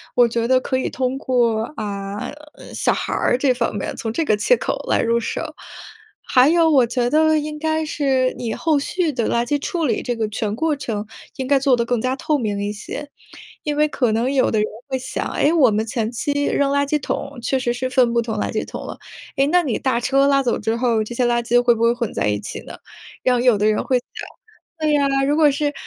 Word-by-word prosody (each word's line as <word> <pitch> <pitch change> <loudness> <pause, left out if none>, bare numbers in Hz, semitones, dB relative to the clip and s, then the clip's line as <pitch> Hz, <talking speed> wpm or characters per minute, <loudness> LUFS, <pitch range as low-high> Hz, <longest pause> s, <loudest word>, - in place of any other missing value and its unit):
我 245 - +6
觉 230 0 -1
得 260 +1 +4
可 260 - -1
以 260 - -1
通 255 0 -2
过， 240 -5 +1
啊 200 -3 -5 0.2
呃， - - -13
小 - - +1
孩 - - -3
儿 - - +1
这 260 0 +2
方 240 -3 -2
面， 205 - -3
从 225 -1 -4
这 325 - 0
个 215 -9 +2
切 355 - +3
口 - - -3
来 - - +2
入 235 0 +1
手。 305 +7 -4 0.7
还 255 +1 +4
有 330 +1 +4
我 270 -5 +5
觉 240 +1 0
得 315 +2 +3
应 300 0 -4
该 315 0 0
是 265 -4 +1
你 230 -2 -3
后 315 -3 +1
续 335 +3 -1
的 240 -5 -1
垃 235 0 +1
圾 290 +4 0
处 330 +3 -2
理 265 - 0
这 245 - -2
个 220 -2 -2
全 210 0 -3
过 320 +5 0
程， 220 -6 -4 0.3
应 265 - -4
该 275 +1 +3
做 270 -1 +3
得 235 - 0
更 245 0 0
加 255 +3 -1
透 300 +2 0
明 205 -5 -2
一 205 - -2
些。 285 +7 -7 0.5
因 295 -1 -2
为 300 - +4
可 250 -6 0
能 235 +4 0
有 270 -2 +2
的 220 - 0
人 210 - +2 0.2
会 265 -1 -1
想： 260 0 -4
“诶， 295 - +3
我 305 -7 +5
们 215 +1 0
前 225 -1 -2
期 285 +4 -1
扔 280 -1 +1
垃 285 0 +1
圾 300 - +1
桶 280 0 -4
确 265 +3 0
实 240 -1 -1
是 255 +1 -3
分 245 -2 +3
不 235 - +2
同 225 -1 -4
垃 - - -1
圾 215 - -2
桶 - - -7
了， - - -7 0.4
诶， 275 -1 +3
那 355 +4 +4
你 275 -9 -1
大 255 -3 0
车 275 +3 +2
拉 275 -1 +3
走 250 -3 0
之 220 +1 -1
后， 235 -3 +1
这 215 - -7
些 245 +1 +1
垃 240 0 +1
圾 240 +1 +3
会 240 -1 +3
不 225 - -5
会 230 0 +4
混 240 -3 -3
在 - - 0
一 105 0 0
起 105 - -7
呢？ - - -10 0.5
“然 255 - +3
后 240 - +1
有 245 -3 +4
的 205 - 0
人 215 0 +1
会 255 - +2
想 245 - -23 0.7
对 305 -1 +2
啊， 275 -1 +1
如 290 - +2
果 305 -2 +5
是， 290 +1 -1
255 Hz, 265 characters per minute, -21 LUFS, 230-285 Hz, 0.7 s, 我